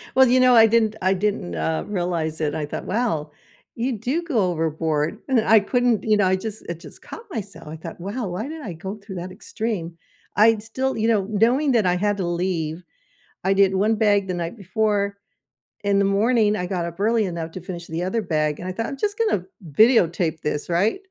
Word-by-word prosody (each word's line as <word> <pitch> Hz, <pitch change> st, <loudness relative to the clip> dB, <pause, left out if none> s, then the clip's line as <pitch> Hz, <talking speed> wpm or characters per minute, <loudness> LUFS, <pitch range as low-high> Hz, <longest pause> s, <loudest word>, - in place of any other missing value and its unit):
Well, 265 Hz, -1 st, +7 dB
you 255 Hz, +1 st, +4 dB
know, 255 Hz, -1 st, +6 dB
I 225 Hz, -1 st, +8 dB
didn't 220 Hz, -1 st, +2 dB
I 185 Hz, +1 st, +3 dB
didn't, 190 Hz, -, -2 dB
uh, 80 Hz, 0 st, -1 dB
realize 170 Hz, -5 st, -2 dB
it. 150 Hz, -1 st, 0 dB
I 150 Hz, -, -2 dB
thought, -, -, -6 dB
"Wow, 185 Hz, -9 st, -1 dB, 0.4 s
you 240 Hz, 0 st, -1 dB
do 255 Hz, -, -1 dB
go 285 Hz, -10 st, 0 dB
overboard," 160 Hz, -1 st, -1 dB
and 265 Hz, -3 st, +2 dB
then 220 Hz, -, +2 dB
I 220 Hz, -1 st, +7 dB
couldn't 245 Hz, +1 st, +1 dB
you 215 Hz, -1 st, +3 dB
know, 200 Hz, -, +3 dB
I 185 Hz, -, +3 dB
just 215 Hz, +3 st, -6 dB
it 170 Hz, -1 st, -4 dB
just -, -, -13 dB
caught 455 Hz, -, -10 dB
myself. 190 Hz, -, -6 dB
I 155 Hz, -, -6 dB
thought, 165 Hz, +2 st, -9 dB
"Wow, 205 Hz, +6 st, -4 dB
why 185 Hz, +7 st, -4 dB
did 315 Hz, +1 st, -7 dB
I 195 Hz, -10 st, -6 dB
go 190 Hz, +5 st, -6 dB
through 200 Hz, -2 st, -10 dB
that 180 Hz, +1 st, -6 dB
extreme?" 185 Hz, -4 st, -4 dB, 0.4 s
I'd 215 Hz, 0 st, +4 dB
still, 260 Hz, +4 st, -2 dB
you 220 Hz, 0 st, +1 dB
know 215 Hz, -4 st, +2 dB
knowing 240 Hz, +7 st, +2 dB
that 225 Hz, -4 st, +3 dB
I 180 Hz, 0 st, +3 dB
had 205 Hz, +2 st, 0 dB
to 185 Hz, -, -2 dB
leave, 175 Hz, -1 st, -2 dB, 0.6 s
I 195 Hz, -, +3 dB
did 195 Hz, -1 st, +4 dB
1 210 Hz, +4 st, +2 dB
bag 205 Hz, -3 st, +2 dB
the 185 Hz, -, -1 dB
night 170 Hz, +5 st, -4 dB
before, 200 Hz, 0 st, 0 dB, 0.7 s
in 200 Hz, -1 st, +2 dB
the 200 Hz, -, +3 dB
morning, 210 Hz, +2 st, +3 dB
I 180 Hz, -3 st, -2 dB
got 175 Hz, -2 st, -2 dB
up 170 Hz, +2 st, -7 dB
early 220 Hz, +1 st, +2 dB
enough 170 Hz, -3 st, -4 dB
to 185 Hz, -, -8 dB
finish 175 Hz, -1 st, -7 dB
the 165 Hz, +2 st, -3 dB
other 190 Hz, +5 st, -1 dB
bag, 155 Hz, -5 st, -1 dB
and 180 Hz, -, -6 dB
I -, -, -2 dB
thought, 225 Hz, +5 st, -3 dB
"I'm 275 Hz, -, -6 dB
just 410 Hz, +7 st, -1 dB
going 450 Hz, -, +2 dB
to 180 Hz, -, -15 dB, 0.3 s
videotape 175 Hz, -, +3 dB
this, 150 Hz, +1 st, -3 dB
right, 195 Hz, -, +1 dB
200 Hz, 225 wpm, -23 LUFS, 170-225 Hz, 0.7 s, I